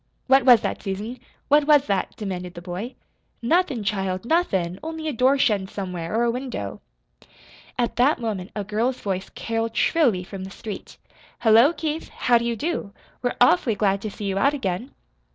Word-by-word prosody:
"What 265 -1 +4
was 245 -4 +8
that, - - -3
Susan? 210 +5 -5 0.3
What 295 +1 +4
was 295 -2 +6
that?" 195 -6 -1
demanded 180 -4 -5
the 175 - -8
boy. 185 +8 -5 0.4
"Nothin', 270 - +1
child, 190 -1 -2
nothin', 190 - 0
only 320 0 -5
a 305 - -1
door 260 +3 +3
shuttin' 210 -8 +2
somewhere, 180 -2 -5
or 235 - +2
a 235 - +2
window." 245 - -5 1.0
At 240 -1 -1
that 265 +6 +3
moment 210 -5 -3
a 205 - -2
girl's 225 +5 -1
voice 190 -2 -3
caroled 225 0 -3
shrilly 240 - +3
from 190 +1 -8
the 190 - -7
street. 205 +1 -8 0.4
"Hullo, 230 +6 +6
Keith, 320 -1 -4
how 240 -1 +2
do 235 - -3
you 235 0 0
do? 270 -7 -3 0.3
We're 245 0 -1
awfully 230 -1 +4
glad 200 -1 +1
to 215 - -4
see 205 +1 -7
you 195 0 -1
out 280 +5 +3
again." 205 0 -3
225 Hz, 180 wpm, -24 LUFS, 195-260 Hz, 1.0 s, was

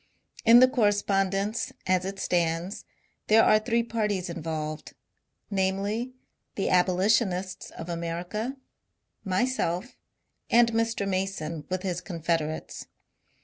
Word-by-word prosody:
In 235 +2 +8
the 255 - +8
correspondence, 205 -3 +1
as 185 0 +2
it 195 +1 -4
stands, 170 +1 -1 0.4
there 220 +1 +6
are 215 - +5
three 230 +1 +1
parties 210 -6 -2
involved 155 -2 -5 0.3
— - - -48
namely, 200 +6 -1 0.4
the 195 - -1
abolitionists 185 +1 +1
of 165 - -9
America, 175 +9 -4 0.7
myself, 190 0 -1 0.5
and 235 0 +5
Mr. 225 -3 0
Mason 185 -6 -3
with 185 0 -2
his 180 -2 -2
confederates. 165 -3 -3
195 Hz, 105 wpm, -27 LUFS, 175-220 Hz, 0.7 s, In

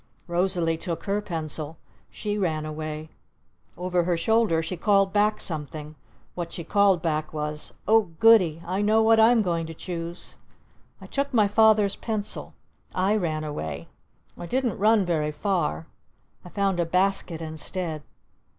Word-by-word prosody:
Rosalee 175 -2 0
took 170 0 -5
her 205 +1 -1
pencil. 160 -4 -4 0.3
She 210 -1 -4
ran 160 -6 -1
away. 155 0 -5 0.7
Over 180 -1 0
her 175 -1 +1
shoulder 210 -3 +2
she 185 - -3
called 195 +1 +2
back 210 +1 +2
something. 150 -2 -3 0.4
What 175 -1 -5
she 170 - -5
called 195 -1 +3
back 155 -2 -1
was 150 0 -3
"Oh 220 -3 +4
Goody! 185 -8 +5
I 185 +3 -1
know 215 +2 +3
what 225 0 +5
I'm 225 0 +5
going 170 -3 -1
to 165 - -8
choose!" 170 0 -7 0.6
I - - -11
took 280 0 -2
my 215 -3 +5
Father's 210 -1 +4
pencil. 215 -2 -4 0.4
I 190 +3 +2
ran 160 -6 -1
away. 145 - -5 0.5
I 175 - -8
didn't 250 -2 -1
run 215 -1 +4
very 155 -3 0
far. 150 - -1 0.6
I 180 - -11
found 195 -1 0
a 170 - +2
basket 185 -1 +1
instead. 160 0 -4
180 Hz, 150 wpm, -25 LUFS, 160-205 Hz, 0.7 s, Goody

